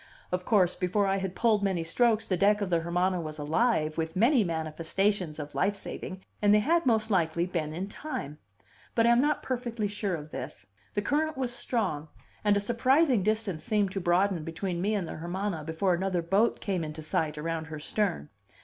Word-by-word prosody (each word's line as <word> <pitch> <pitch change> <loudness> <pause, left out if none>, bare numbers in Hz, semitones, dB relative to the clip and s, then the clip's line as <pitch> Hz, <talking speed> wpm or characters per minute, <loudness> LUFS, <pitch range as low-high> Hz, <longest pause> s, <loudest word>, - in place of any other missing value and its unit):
Of 180 0 -2
course, 185 -5 +3
before 190 +3 +1
I 195 0 +1
had 190 -1 -3
pulled 220 -3 +3
many 190 -4 0
strokes, 225 +5 +2
the 185 - 0
deck 205 +3 +3
of 200 -3 -2
the 170 - +3
Hermana 180 +2 0
was 155 -1 -6
alive 155 0 +1
with 160 0 -2
many 235 +5 +4
manifestations 165 +2 -1
of 150 -1 -6
life 200 +2 +1
saving 190 -1 -7 0.2
and 205 -1 +4
they - - +6
had 330 +6 +2
most 220 -2 +2
likely 170 -2 +2
been 165 -4 -2
in 180 +5 -4
time. 200 - -6 0.6
But 230 - +4
I 235 - +6
am 235 +1 +5
not 295 +1 +1
perfectly 240 -4 -2
sure 205 -2 -2
of 150 -1 -8
this; 100 - -7 0.3
the 205 - 0
current 310 +4 0
was 255 -2 -1
strong, 195 - -2 0.4
and 205 -1 +4
a - - +3
surprising 250 +4 +3
distance 210 -4 -1
seemed 210 -4 +1
to 195 - -2
broaden 175 0 +2
between 170 +2 -3
me 210 +3 +1
and 190 -5 -2
the - - -6
Hermana 175 0 -3
before 165 +4 +1
another 180 -1 0
boat 195 +7 +2
came 185 -4 -1
into 155 0 -6
sight 155 0 -1
around 160 +1 -3
her 160 -1 -7
stern. 180 +1 -2
190 Hz, 200 wpm, -29 LUFS, 165-215 Hz, 0.6 s, they